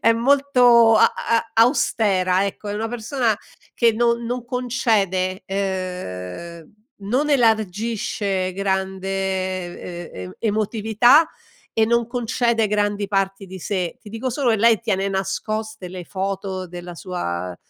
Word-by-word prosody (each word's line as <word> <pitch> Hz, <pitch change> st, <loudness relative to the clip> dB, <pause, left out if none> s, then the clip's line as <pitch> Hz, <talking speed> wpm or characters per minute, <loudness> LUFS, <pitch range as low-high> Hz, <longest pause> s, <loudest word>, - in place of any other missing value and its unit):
è 230 Hz, -, +5 dB
molto 245 Hz, -3 st, +5 dB
a -, -, +5 dB
a 230 Hz, 0 st, 0 dB
austera 200 Hz, -6 st, +3 dB
ecco, 200 Hz, +1 st, -6 dB
è -, -, -2 dB
una 225 Hz, +2 st, -2 dB
persona 235 Hz, -1 st, -1 dB, 0.4 s
che 235 Hz, -1 st, +4 dB
no 235 Hz, +1 st, +2 dB
non 235 Hz, +1 st, -4 dB
concede, 210 Hz, -7 st, 0 dB
ehm, 180 Hz, -, -5 dB, 0.3 s
non 255 Hz, +9 st, 0 dB
elargisce 215 Hz, -5 st, 0 dB
grande 190 Hz, 0 st, -2 dB, 1.0 s
e 90 Hz, -, -8 dB, 0.2 s
e 225 Hz, -, -1 dB
emotività 220 Hz, +7 st, +4 dB, 0.4 s
e 220 Hz, -, +3 dB
non 235 Hz, 0 st, +2 dB
concede 235 Hz, -1 st, +1 dB
grandi 205 Hz, 0 st, 0 dB
parti 195 Hz, 0 st, -1 dB
di 190 Hz, 0 st, -9 dB
sé. 180 Hz, -2 st, -2 dB
Ti 215 Hz, -, -12 dB
dico 225 Hz, +4 st, -3 dB
solo 255 Hz, 0 st, 0 dB
che 220 Hz, -, +3 dB
lei 225 Hz, 0 st, +4 dB
tiene 200 Hz, -4 st, 0 dB
nascoste 200 Hz, +1 st, -3 dB
le 180 Hz, 0 st, -7 dB
foto 190 Hz, 0 st, -4 dB
della 175 Hz, 0 st, -8 dB
sua, 90 Hz, -, -4 dB
210 Hz, 130 wpm, -22 LUFS, 190-235 Hz, 1.0 s, è